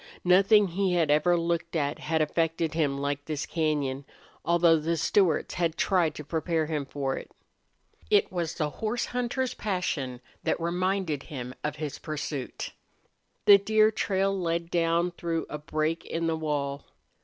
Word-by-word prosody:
Nothing 195 +3 +5
he 185 +1 0
had 165 -4 +2
ever 175 +4 +4
looked 170 0 -1
at 145 -2 -1
had 160 0 +1
affected 165 +1 0
him 150 -4 +1
like 145 0 -2
this 155 -2 -3
cañon, 145 -4 -1 0.4
although 170 -1 +4
the 165 +2 -1
Stewarts 170 +1 +2
had 165 -2 -1
tried 175 -6 +2
to 150 - -6
prepare 160 +1 -1
him 150 -3 -3
for 135 -2 -2
it. - - -8 0.8
It 420 0 +3
was 170 -3 -2
the 150 -2 -1
horse 225 +6 -2
hunter's 250 +1 -2
passion 160 - -2 0.2
that - - 0
reminded 175 -2 -1
him 125 -4 -6
of 150 0 -2
his 150 -2 -5
pursuit. 150 -3 -5 0.7
The 200 -1 +9
deer 215 +2 +4
trail 195 -2 0
led 170 -2 -2
down 170 +1 +2
through 170 -1 -3
a 150 - -4
break 155 +2 -1
in 165 0 -3
the 165 -1 +1
wall. 145 -3 -2
165 Hz, 155 wpm, -28 LUFS, 150-180 Hz, 0.8 s, The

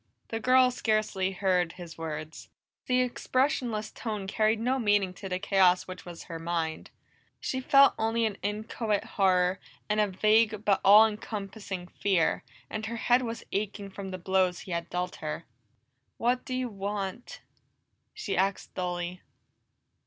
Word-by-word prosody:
The 225 - -2
girl 255 +2 +5
scarcely 215 -5 0
heard 180 -3 +1
his 175 -2 -10
words; 155 -1 -6 0.4
the 255 0 +3
expressionless 250 -3 0
tone 215 -4 -4
carried 215 +2 +1
no 255 +4 +1
meaning 205 -5 +2
to 195 +1 -8
the 180 - -1
chaos 185 -2 +3
which 185 -1 -9
was 175 -1 -8
her 165 -1 -7
mind. 165 -1 -3 0.5
She 260 - -2
felt 275 +1 +6
only 225 +1 +1
an 215 -3 -3
inchoate 210 0 -2
horror 185 -1 +2 0.3
and 210 0 +1
a 210 - +4
vague 215 +2 +2
but 200 -2 +3
all 210 +3 +9
encompassing 205 -3 -5
fear, 180 -5 +1 0.2
and 220 0 -4
her 230 +1 -4
head 245 +2 +3
was 230 -2 -5
aching 200 -1 -3
from 195 0 -7
the 185 - -5
blows 185 0 +1
he 185 - -9
had 170 0 -3
dealt 180 0 -3
her. 155 +2 -5 0.7
"What 245 +2 0
do 255 - -3
you 255 -1 -1
want?" 200 +2 -5 0.7
she 425 - -3
asked 195 +1 0
dully. 180 0 -3
200 Hz, 155 wpm, -29 LUFS, 185-225 Hz, 0.7 s, all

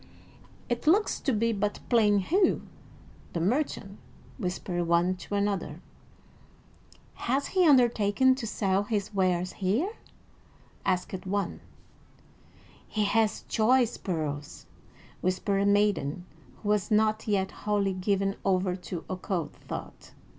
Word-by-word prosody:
"It 240 +4 -3
looks 405 +7 +3
to 275 - 0
be 230 0 +1
but 205 0 -1
plain 215 -4 +4
Hugh, 360 - +2 0.7
the 170 - -1
merchant," 200 - -1 0.4
whispered 180 -3 -2
one 170 +2 +3
to 190 +3 -5
another. 200 -6 -1 1.5
"Hath 275 +3 +1
he 370 -3 +3
undertaken 245 -2 +4
to 255 -3 -4
sell 195 -2 +1
his 205 -1 -2
wares 185 -2 +1
here?" 215 - 0 1.0
asked 185 +1 -1
one. 200 +1 -1 1.3
"He 215 - -1
hath 215 +1 +1
choice 240 +1 +3
pearls," 150 -5 -4 0.6
whispered 185 +2 0
a - - +2
maiden 200 -6 +1 0.4
who 205 - -2
was 210 -1 +1
not 215 +1 +2
yet 195 -2 +1
wholly 205 -2 0
given 195 +1 0
over 185 -1 +1
to 180 -2 -7
occult 185 -2 -3
thought. - - -9
200 Hz, 120 wpm, -28 LUFS, 185-220 Hz, 1.5 s, plain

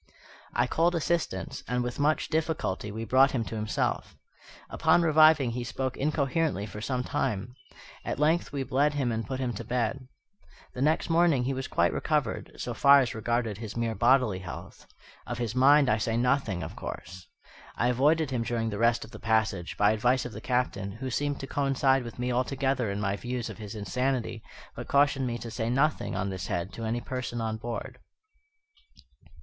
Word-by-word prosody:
I - - +3
called 170 +2 +1
assistance, 165 - -1
and, 125 0 0
with 120 +2 -4
much 150 +2 +1
difficulty, 155 - -1
we 110 +2 -5
brought 130 +4 +5
him 120 -4 0
to 115 - -6
himself. 105 -1 -2 0.5
Upon 175 - +3
reviving 155 -5 +5
he 120 +1 -3
spoke 125 +2 -3
incoherently 145 - 0
for 105 0 -8
some 125 +2 -1
time. 110 0 -2 0.5
At - - -3
length 155 +4 +2
we 140 -2 -2
bled 140 +3 +1
him 130 -4 0
and 115 0 -3
put 130 -1 -3
him 125 -2 -1
to 100 - -6
bed. 125 +2 -2 0.7
The 125 - -5
next 155 +3 +1
morning 165 -6 +4
he 135 +2 -1
was 130 0 -4
quite - - +1
recovered, - - -1
so - - -4
far 140 0 +7
as 125 - -1
regarded 115 -1 -1
his 110 -1 -7
mere 115 -1 0
bodily 120 -3 +3
health. 90 -1 -9 0.4
Of 120 - -4
his 120 -2 -2
mind 140 +3 +5
I 110 -1 +2
say 115 +1 0
nothing, 120 -7 +1
of - - -7
course. 90 0 -8 0.5
I 120 - +1
avoided 145 +4 +2
him 125 -3 0
during 115 -1 -1
the 100 - -4
rest 115 0 +2
of 110 - -16
the 105 - -10
passage, 110 -6 0
by 105 0 +4
advice 125 +4 +1
of 125 - -5
the - - -8
Captain, 115 -6 -1
who 130 +4 -5
seemed 145 +2 -1
to - - -4
coincide 135 -1 +1
with 115 - -9
me 125 +1 -1
altogether 130 -1 0
in 100 +1 -3
my 100 -1 -1
views 125 0 -4
of - - -12
his 105 0 -7
insanity, 120 +1 -2 0.3
but - - -7
cautioned 140 -2 +3
me 120 -1 -2
to 115 -1 -7
say 115 0 -2
nothing 140 +5 +1
on 95 - -2
this 95 -2 -5
head 85 +3 -3
to 115 - -5
any 115 +2 -1
person 125 -2 -4
on 110 -1 -2
board. 115 +1 -6
125 Hz, 190 wpm, -28 LUFS, 110-135 Hz, 0.7 s, far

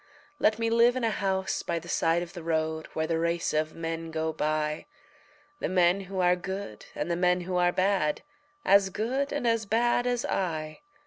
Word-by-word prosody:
Let 215 0 +3
me 230 0 0
live 235 +2 +5
in 255 - -2
a 225 - +2
house 190 -2 -1
by 170 - -2
the 165 - -7
side 165 +1 +1
of 175 - -10
the 175 - -7
road 160 -1 -1
Where 160 - 0
the 160 0 0
race 170 0 0
of 155 0 0
men 165 0 -4
go 160 0 -2
by 155 0 -1 0.7
The - - -2
men 180 +1 +3
who 195 -1 -3
are 180 0 +4
good 190 - -6
and 155 +4 -2
the - - +1
men 180 +1 +2
who 180 +1 -2
are 175 0 +3
bad, 185 -5 +1 0.4
As 200 0 +5
good 255 +8 -1
and 285 -4 -2
as 230 -2 +1
bad 240 +3 +2
as 245 -1 0
I. 155 -5 -2
180 Hz, 200 wpm, -28 LUFS, 160-205 Hz, 0.7 s, live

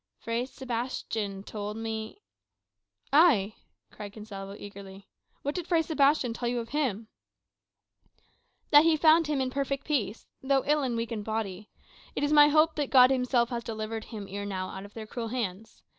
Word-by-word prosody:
Fray 230 +2 -2
Sebastian 230 -6 -4
told 210 0 -5
me 220 -1 -5 0.5
" 100 - -38 0.2
"Ay," 210 -6 0 0.4
cried 205 -1 -9
Gonsalvo 200 -2 -8
eagerly, 195 -1 -11 0.4
"what 285 - -1
did 355 0 -4
Fray 335 -2 +3
Sebastian 285 -5 +2
tell 235 +1 -2
you 245 - -1
of 230 -1 -6
him?" 245 -8 -1 1.6
"That 295 0 +9
he 325 -1 +4
found 320 +1 +5
him 295 -2 0
in 260 -1 -1
perfect 275 0 -2
peace, 240 -8 -1 0.2
though 270 0 +1
ill 300 +1 +2
and 250 -4 -1
weak 230 +1 -3
in 220 -2 -3
body. 210 -2 -4 0.5
It - - -1
is 290 +1 +2
my 295 -1 +8
hope 310 +2 +4
that 290 -3 -1
God 255 -1 +7
himself 250 -2 +2
has 235 -2 -3
delivered 220 0 -5
him 215 -4 -7
ere 200 +1 -5
now 190 -2 -4
out 190 +1 -7
of 205 - -15
their 220 -1 -6
cruel 230 +1 -5
hands. 225 -3 -5
230 Hz, 175 wpm, -28 LUFS, 205-275 Hz, 1.6 s, That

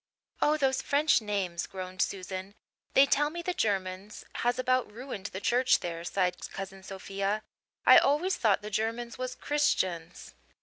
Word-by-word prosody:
"Oh, 300 +1 +4
those 265 -3 +1
French 290 -2 +3
names," 195 -5 -2
groaned 185 -1 -5
Susan. 190 +1 -3 0.4
"They 270 - +8
tell 295 +1 +2
me 340 +2 -6
the 360 - -1
Germans 195 - -2
has 245 +1 +1
about 255 -3 +1
ruined 225 -3 -6
the 190 - -6
church 245 +5 +3
there," 170 -1 -4
sighed 180 0 -1
Cousin 195 0 -7
Sophia. 195 +2 -3 0.4
"I - - +10
always 320 +7 +2
thought 210 -3 +2
the 210 - -6
Germans 230 +3 -2
was 255 0 -3
Christians." 185 - -1
210 Hz, 150 wpm, -29 LUFS, 190-255 Hz, 0.4 s, I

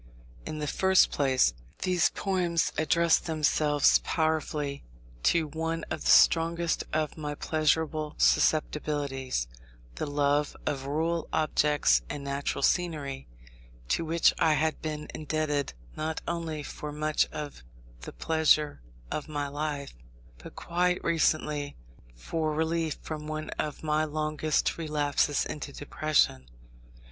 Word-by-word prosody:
In 155 - -4
the 150 - -3
first 190 +5 +4
place, 130 - +2 0.3
these 180 -2 +3
poems 180 -4 0
addressed 170 +1 +2
themselves 150 -2 +3
powerfully 155 -3 -1 0.4
to 165 - +2
one 165 +2 -3
of - - -3
the - - -1
strongest 165 0 +4
of 155 0 -1
my 150 -1 -4
pleasurable 155 0 0
susceptibilities, 145 - +1 0.5
the - - -2
love 145 0 +1
of 135 -1 -2
rural 165 +3 -1
objects 150 - +2
and 145 - -5
natural 140 0 -2
scenery; 145 -7 0 0.6
to - - +1
which 165 +1 +3
I 160 -1 +4
had 155 +1 0
been 150 -1 -4
indebted 150 - -1 0.2
not 155 +1 -3
only 160 -3 -3
for 150 +1 -6
much 155 +1 +1
of 145 - -7 0.4
the - - -8
pleasure 155 - +2 0.3
of 150 - -3
my 145 -1 -2
life, 145 -1 -4 0.5
but - - -12
quite 180 +1 0
recently 150 -3 0 0.4
for 155 - -2
relief 160 0 -1
from 150 -1 -6
one 155 0 -4
of 150 0 -3
my 155 0 +1
longest 155 +1 -1
relapses 145 -2 +1
into 150 -1 -6
depression. 145 - 0
155 Hz, 120 wpm, -28 LUFS, 145-160 Hz, 0.6 s, first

